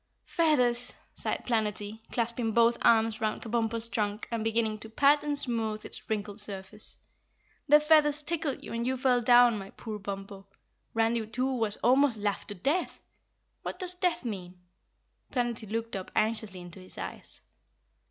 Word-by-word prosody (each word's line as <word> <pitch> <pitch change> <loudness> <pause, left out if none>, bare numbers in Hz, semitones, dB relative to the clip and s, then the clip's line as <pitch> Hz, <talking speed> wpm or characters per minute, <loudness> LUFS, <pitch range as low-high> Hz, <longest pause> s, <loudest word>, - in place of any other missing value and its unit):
"Feathers!" 250 -7 +2 0.2
sighed - - -3
Planetty, 215 -2 -1
clasping 235 -1 -1
both 235 +1 +5
arms 225 -1 +4
round 215 -1 -1
Kabumpo's 230 0 0
trunk 210 -1 -2
and 230 -2 -1
beginning 220 -1 0
to 220 - -9
pat 285 +6 +4
and 295 -1 -1
smooth 225 -5 0
its - - -4
wrinkled 210 -1 -2
surface. 205 0 -5 0.7
"The 300 +1 +8
feathers 300 -1 +4
tickled 315 -3 -2
you - - -7
and 235 +1 -2
you 260 0 0
fell 250 -1 +3
down, 240 -1 +6
my 195 0 -8
poor 215 -1 -7
Bumpo. 195 0 -7 0.5
Randy 225 0 +1
too 255 +4 -1
was 220 -4 -1
almost 255 0 +4
laughed 205 -1 -2
to 205 - -4
the 180 - -20
death. 320 - 0 0.6
What - - -5
does 365 -2 -2
death 360 -6 -1
mean?" 185 -5 -5 0.7
Planetty 235 -4 -2
looked 230 0 -3
up 190 -1 -5
anxiously 215 -4 0
into 175 +1 -10
his 185 - -14
eyes. - - -5
230 Hz, 160 wpm, -29 LUFS, 210-250 Hz, 0.7 s, The